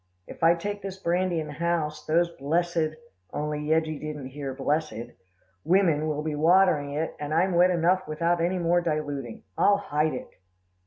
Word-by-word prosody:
'If -, -, -12 dB
I 165 Hz, +1 st, +6 dB
take 205 Hz, +4 st, -4 dB
this 195 Hz, -1 st, -6 dB
brandy 180 Hz, -1 st, 0 dB
in 155 Hz, -, -3 dB
the 150 Hz, -, -8 dB
house, 165 Hz, -1 st, -2 dB
those 170 Hz, +2 st, +2 dB
blessed' 160 Hz, +2 st, 0 dB, 0.4 s
only 150 Hz, 0 st, -2 dB
Yeggie 155 Hz, 0 st, 0 dB
didn't 150 Hz, -3 st, -6 dB
hear 140 Hz, 0 st, -5 dB
blessed 140 Hz, -2 st, -2 dB, 0.5 s
'women 170 Hz, -5 st, +3 dB
will 150 Hz, -1 st, -2 dB
be 155 Hz, -1 st, -2 dB
watering 155 Hz, -2 st, +3 dB
it, 155 Hz, +2 st, -2 dB
and 150 Hz, 0 st, -4 dB
I'm 180 Hz, +3 st, +2 dB
wet 175 Hz, +1 st, +5 dB
enough 180 Hz, +2 st, +2 dB
without 170 Hz, +3 st, 0 dB
any 180 Hz, +2 st, +1 dB
more 175 Hz, 0 st, +2 dB
diluting. 145 Hz, -7 st, -3 dB, 0.2 s
I'll 200 Hz, 0 st, +5 dB
hide 155 Hz, -5 st, 0 dB
it. -, -, -7 dB
160 Hz, 170 wpm, -26 LUFS, 150-175 Hz, 0.5 s, I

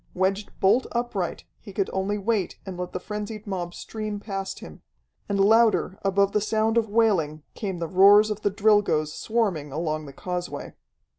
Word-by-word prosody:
Wedged 195 Hz, +2 st, 0 dB
bolt 200 Hz, +7 st, +3 dB
upright, 235 Hz, -7 st, -2 dB, 0.2 s
he 200 Hz, -, -11 dB
could 195 Hz, 0 st, -1 dB
only 195 Hz, +2 st, -1 dB
wait 205 Hz, -2 st, -1 dB
and 190 Hz, -2 st, -6 dB
let 180 Hz, 0 st, -5 dB
the -, -, -4 dB
frenzied 210 Hz, +2 st, -6 dB
mob 180 Hz, -4 st, -4 dB
stream 215 Hz, -2 st, -5 dB
past 195 Hz, -2 st, -5 dB
him. -, -, -11 dB, 0.5 s
And 200 Hz, -1 st, 0 dB
louder 220 Hz, -1 st, +4 dB
above 200 Hz, 0 st, +2 dB
the 210 Hz, -, +1 dB
sound 220 Hz, +1 st, +1 dB
of 225 Hz, -2 st, +2 dB
wailing 185 Hz, -9 st, +1 dB
came 195 Hz, -4 st, -4 dB
the 170 Hz, -1 st, -3 dB
roars 200 Hz, +4 st, +6 dB
of 210 Hz, 0 st, -4 dB
the 205 Hz, -, +2 dB
Drilgoes 200 Hz, -7 st, +2 dB
swarming 195 Hz, -11 st, -1 dB
along 155 Hz, 0 st, -2 dB
the 140 Hz, -, -10 dB
causeway. 180 Hz, +2 st, -5 dB
200 Hz, 170 wpm, -25 LUFS, 180-215 Hz, 0.5 s, roars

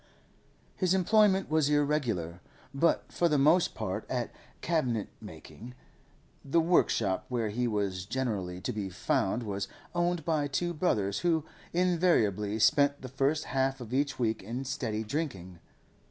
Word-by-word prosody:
His 185 Hz, -1 st, +2 dB
employment 195 Hz, +1 st, +3 dB
was 155 Hz, -2 st, +2 dB
irregular, 125 Hz, -, 0 dB, 0.3 s
but 165 Hz, +5 st, +1 dB
for 170 Hz, -, +1 dB
the 150 Hz, -, +2 dB
most 155 Hz, +6 st, +4 dB
part -, -, -3 dB
at -, -, -2 dB, 0.3 s
cabinet 125 Hz, -11 st, 0 dB
making. 125 Hz, +3 st, -11 dB, 0.7 s
The 140 Hz, +4 st, +2 dB
workshop 115 Hz, -, +2 dB
where 120 Hz, -4 st, -1 dB
he 120 Hz, +4 st, -1 dB
was 100 Hz, -4 st, -2 dB
generally 105 Hz, -8 st, -3 dB
to -, -, -3 dB
be 100 Hz, -3 st, -3 dB
found 95 Hz, +5 st, 0 dB
was 100 Hz, -2 st, -3 dB, 0.3 s
owned 175 Hz, -2 st, 0 dB
by 155 Hz, -3 st, +1 dB
two 175 Hz, +5 st, -1 dB
brothers, 105 Hz, -, 0 dB
who 165 Hz, -3 st, +1 dB, 0.3 s
invariably 165 Hz, -, +2 dB
spent 140 Hz, +5 st, +3 dB
the 130 Hz, -, -6 dB
first 135 Hz, +4 st, 0 dB
half 135 Hz, +1 st, -1 dB
of 120 Hz, -1 st, -8 dB
each 140 Hz, +1 st, 0 dB
week 115 Hz, -3 st, 0 dB
in 120 Hz, +7 st, -5 dB
steady 110 Hz, -4 st, -2 dB
drinking. 105 Hz, -, -4 dB
135 Hz, 140 wpm, -30 LUFS, 105-160 Hz, 0.7 s, most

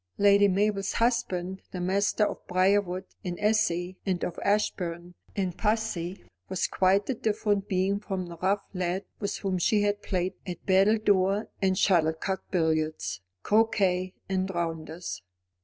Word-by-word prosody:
Lady 200 Hz, 0 st, +6 dB
Mabel's 200 Hz, +1 st, +1 dB
husband, 190 Hz, -6 st, 0 dB
the 180 Hz, -, -6 dB
master 200 Hz, +4 st, +2 dB
of -, -, -3 dB
Briarwood 185 Hz, 0 st, +2 dB, 0.2 s
in 175 Hz, -1 st, -4 dB
esse, 205 Hz, -4 st, +1 dB
and 185 Hz, -3 st, -1 dB
of 175 Hz, -, -3 dB
Ashbourne 180 Hz, -4 st, -1 dB, 0.2 s
in 190 Hz, -3 st, -1 dB
posse, 210 Hz, -4 st, -1 dB, 0.3 s
was 190 Hz, -1 st, 0 dB
quite 195 Hz, +2 st, +2 dB
a -, -, +1 dB
different 210 Hz, -3 st, 0 dB
being 190 Hz, +2 st, +1 dB
from 190 Hz, -3 st, -4 dB
the 170 Hz, -1 st, -9 dB
rough 195 Hz, +3 st, 0 dB
lad 185 Hz, +1 st, -2 dB
with 200 Hz, -, -2 dB
whom 190 Hz, -2 st, -1 dB
she 205 Hz, +4 st, +3 dB
had 205 Hz, 0 st, 0 dB
played 185 Hz, -2 st, -1 dB
at 175 Hz, -2 st, -6 dB
battledore 200 Hz, 0 st, +3 dB
and 190 Hz, -1 st, +2 dB
shuttlecock, 175 Hz, 0 st, +2 dB
billiards, 155 Hz, -, 0 dB, 0.2 s
croquet, 190 Hz, -4 st, +2 dB
and 190 Hz, 0 st, -1 dB
rounders. 165 Hz, -, -4 dB
190 Hz, 140 wpm, -28 LUFS, 180-205 Hz, 0.3 s, Lady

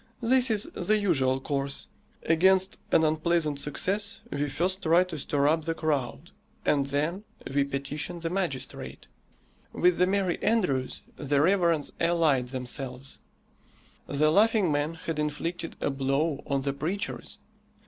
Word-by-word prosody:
This 255 Hz, +2 st, +4 dB
is 215 Hz, -2 st, +1 dB
the 215 Hz, +1 st, +1 dB
usual 135 Hz, -10 st, +2 dB
course. 140 Hz, 0 st, -3 dB, 0.4 s
Against 190 Hz, +3 st, +3 dB
an 160 Hz, -, +4 dB
unpleasant 155 Hz, -1 st, +1 dB
success 195 Hz, +8 st, 0 dB
we 145 Hz, +1 st, -1 dB
first 185 Hz, +7 st, 0 dB
try 170 Hz, +1 st, +4 dB
to 175 Hz, -4 st, -6 dB
stir 140 Hz, +1 st, +1 dB
up 160 Hz, +1 st, +1 dB
the 165 Hz, 0 st, -1 dB
crowd 135 Hz, -, -2 dB, 0.3 s
and 140 Hz, -2 st, +2 dB
then 155 Hz, +8 st, -1 dB, 0.3 s
we 140 Hz, 0 st, +3 dB
petition 140 Hz, +5 st, -4 dB
the 165 Hz, 0 st, -3 dB
magistrate. 175 Hz, -9 st, -3 dB, 0.7 s
With 180 Hz, -1 st, +2 dB
the 180 Hz, -, +4 dB
merry 190 Hz, -2 st, 0 dB
andrews 180 Hz, -, 0 dB
the 145 Hz, -1 st, 0 dB
reverends 170 Hz, -2 st, +2 dB
allied 160 Hz, -7 st, +2 dB
themselves. 130 Hz, +1 st, -6 dB, 0.9 s
The 155 Hz, +2 st, +2 dB
Laughing 210 Hz, -1 st, +3 dB
Man 145 Hz, +3 st, -1 dB
had 160 Hz, -1 st, -4 dB
inflicted 165 Hz, +3 st, -3 dB
a -, -, 0 dB
blow 135 Hz, +3 st, 0 dB
on 140 Hz, -1 st, 0 dB
the 140 Hz, 0 st, -1 dB
preachers. 175 Hz, +8 st, -4 dB
155 Hz, 140 wpm, -27 LUFS, 140-180 Hz, 0.9 s, This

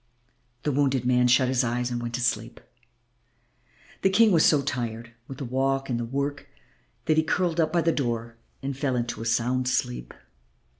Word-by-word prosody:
The 150 Hz, -, 0 dB
wounded 135 Hz, -3 st, +1 dB
man 125 Hz, 0 st, +3 dB
shut 130 Hz, +1 st, +4 dB
his 130 Hz, 0 st, +1 dB
eyes 120 Hz, +1 st, -1 dB
and 120 Hz, 0 st, -2 dB
went 120 Hz, 0 st, -4 dB
to 125 Hz, -, -3 dB
sleep. 115 Hz, -2 st, -1 dB, 1.4 s
The 190 Hz, -, +4 dB
King 215 Hz, +3 st, +5 dB
was 165 Hz, -4 st, +4 dB
so 145 Hz, -3 st, +4 dB
tired 120 Hz, -4 st, -4 dB
with 135 Hz, -, -8 dB
the 135 Hz, -, -5 dB
walk 135 Hz, +2 st, -1 dB
and 120 Hz, -, 0 dB
the 120 Hz, -, -2 dB
work 140 Hz, +4 st, -3 dB, 0.6 s
that 155 Hz, -1 st, +2 dB
he 160 Hz, -, +4 dB
curled 170 Hz, +1 st, 0 dB
up 160 Hz, -1 st, +2 dB
by 175 Hz, -, +2 dB
the 165 Hz, -, +2 dB
door 120 Hz, -5 st, -2 dB, 0.3 s
and 135 Hz, 0 st, -3 dB
fell 135 Hz, -1 st, -1 dB
into 120 Hz, -2 st, -3 dB
a -, -, -5 dB
sound 125 Hz, +2 st, +1 dB
sleep. -, -, -2 dB
130 Hz, 190 wpm, -26 LUFS, 120-145 Hz, 1.4 s, King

